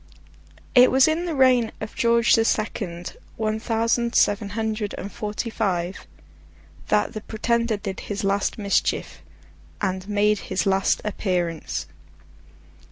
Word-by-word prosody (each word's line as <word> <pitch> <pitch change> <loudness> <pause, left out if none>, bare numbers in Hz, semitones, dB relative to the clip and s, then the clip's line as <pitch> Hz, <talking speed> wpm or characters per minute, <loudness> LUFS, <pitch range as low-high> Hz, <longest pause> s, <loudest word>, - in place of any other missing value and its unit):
It 250 -1 +7
was 265 +2 +5
in 320 +3 0
the 335 -3 -2
reign 255 -4 +4
of 215 - -6
George 235 0 +3
the 225 - +5
Second, 185 -6 -2 0.2
one 220 0 -1
thousand 230 +1 0
seven 205 0 +3
hundred 220 -2 -2
and 200 - -6
forty 210 +2 -4
five, 185 -5 -2 0.8
that 210 0 +1
the 215 - -5
Pretender 230 +1 0
did 195 -1 -5
his 205 -1 -5
last 195 0 0
mischief, 200 -2 -1 0.6
and 190 -1 -2
made 210 0 +2
his 185 - -2
last 195 0 +2
appearance. 180 -6 -2
215 Hz, 130 wpm, -24 LUFS, 195-230 Hz, 0.8 s, It